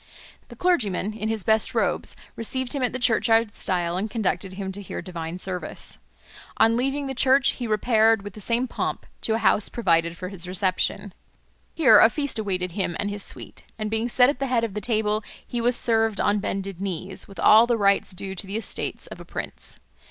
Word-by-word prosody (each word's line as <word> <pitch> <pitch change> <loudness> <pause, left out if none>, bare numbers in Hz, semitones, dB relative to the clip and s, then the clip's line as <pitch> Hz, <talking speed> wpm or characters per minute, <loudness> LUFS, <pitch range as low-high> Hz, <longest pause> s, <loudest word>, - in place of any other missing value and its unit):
The - - -12
clergyman 215 - +1
in 215 0 -3
his 220 -3 -2
best 220 +1 +1
robes - - +1 0.2
received 250 +2 -1
him 280 - -1
at 250 - +1
the 255 - -3
churchyard 225 -3 +2
stile 175 -2 -1
and 210 +4 -2
conducted 195 -4 -2
him 190 0 -5
to 200 +2 -7
hear 200 - -6
divine 170 -2 -6
service. 185 -1 -4 0.6
On 225 +1 +4
leaving 275 +4 -1
the 270 - -3
church 265 +1 +4
he 245 - -5
repaired, 220 0 +3
with 205 -1 -8
the 210 - -8
same 235 +5 0
pomp, - - -3 0.2
to 220 - 0
a - - +1
house 215 -2 +3
provided 170 -6 +1
for 185 +1 -5
his 180 -3 -7
reception. 185 +1 -1 0.6
Here 260 -10 +7
a 225 - +7
feast 285 -4 -3
awaited 185 -4 -2
him 175 -1 -2
and 205 - -1
his 205 0 -4
suite, - - -4 0.2
and 215 -1 -3
being 225 +2 -1
set 250 +1 +5
at 285 - -10
the 275 - -1
head 245 -3 +1
of 225 -4 -2
the 210 - -4
table 215 -2 0 0.2
he 240 - -3
was 240 +1 +3
served 225 -4 +1
on 205 0 +2
bended 195 -2 -4
knees, 190 0 -4
with 195 - -12
all 220 +2 +7
the 240 -1 +2
rites 200 -2 +3
due 190 0 -5
to 195 +1 -4
the 200 +3 -3
estate 225 - -3
of - - -8
a - - -11
prince. - - -7
215 Hz, 210 wpm, -24 LUFS, 190-235 Hz, 0.6 s, Here